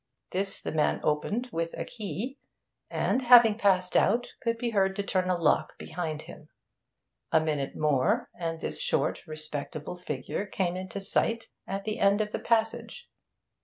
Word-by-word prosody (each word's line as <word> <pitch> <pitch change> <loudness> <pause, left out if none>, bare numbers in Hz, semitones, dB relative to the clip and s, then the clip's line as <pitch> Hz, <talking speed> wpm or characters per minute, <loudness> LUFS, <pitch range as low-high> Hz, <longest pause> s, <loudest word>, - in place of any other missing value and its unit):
This 195 +2 0
the - - -3
man 155 -1 +1
opened 205 +12 0
with 165 -1 -2
a - - -3
key, 240 +4 -5 0.5
and, 260 - +1
having 240 -3 +8
passed 185 -4 +2
out, 235 +4 +3
could 230 -1 0
be 235 0 -2
heard 195 -2 +2
to 200 - -1
turn 185 -2 0
a 180 - +3
lock 165 - +2
behind 155 -2 -4
him. 150 - -12 0.8
A 160 - +6
minute 150 -3 -2
more, 145 -4 +2
and 165 -2 -4
this - - -4
short, - - 0
respectable 155 0 -5
figure 175 +3 -4
came 185 -2 -1
into 185 +2 -5
sight 225 +3 0 0.2
at 195 +1 -3
the 215 0 -3
end 200 +1 +4
of 210 -1 -1
the - - -2
passage. 225 -1 -1
190 Hz, 165 wpm, -28 LUFS, 155-215 Hz, 0.8 s, having